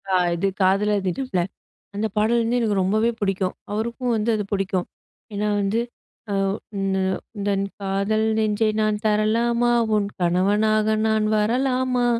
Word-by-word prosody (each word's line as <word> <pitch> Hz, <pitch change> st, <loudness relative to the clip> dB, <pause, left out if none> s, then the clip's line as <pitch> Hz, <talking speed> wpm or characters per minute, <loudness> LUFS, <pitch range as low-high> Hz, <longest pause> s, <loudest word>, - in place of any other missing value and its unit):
ஆ -, -, 0 dB, 0.2 s
இது 175 Hz, +3 st, 0 dB
காதலர் 200 Hz, +2 st, +2 dB
தினம்ல, 190 Hz, 0 st, -1 dB, 0.5 s
அந்த 215 Hz, +2 st, 0 dB
பாடல் 225 Hz, +3 st, +3 dB
வந்து 235 Hz, +2 st, 0 dB
எனக்கு 210 Hz, -4 st, +1 dB
ரொம்பவே 215 Hz, +5 st, +2 dB
புடிக்கும். 195 Hz, -3 st, -1 dB, 0.2 s
அவருக்கும் 235 Hz, +3 st, -2 dB
வந்து 220 Hz, +1 st, 0 dB
அது 210 Hz, -, -1 dB
புடிக்கும். 190 Hz, -2 st, -1 dB, 0.5 s
ஏன்னா 205 Hz, +1 st, -1 dB
வந்து, 200 Hz, +3 st, 0 dB, 0.5 s
"ஆ -, -, 0 dB, 0.4 s
உந்த 195 Hz, 0 st, 0 dB, 0.4 s
உந்தன் 200 Hz, -1 st, 0 dB, 0.2 s
காதல் 200 Hz, +3 st, 0 dB
நெஞ்சை 215 Hz, 0 st, +1 dB
நான் 215 Hz, -1 st, 0 dB
தரலாமா? 230 Hz, +3 st, +2 dB, 0.2 s
உன் 205 Hz, -1 st, +1 dB
கணவனாக 205 Hz, +5 st, +2 dB, 0.2 s
நான் 220 Hz, -1 st, +2 dB
வரலாமா?" 250 Hz, +3 st, +1 dB
210 Hz, 135 wpm, -23 LUFS, 195-225 Hz, 0.5 s, பாடல்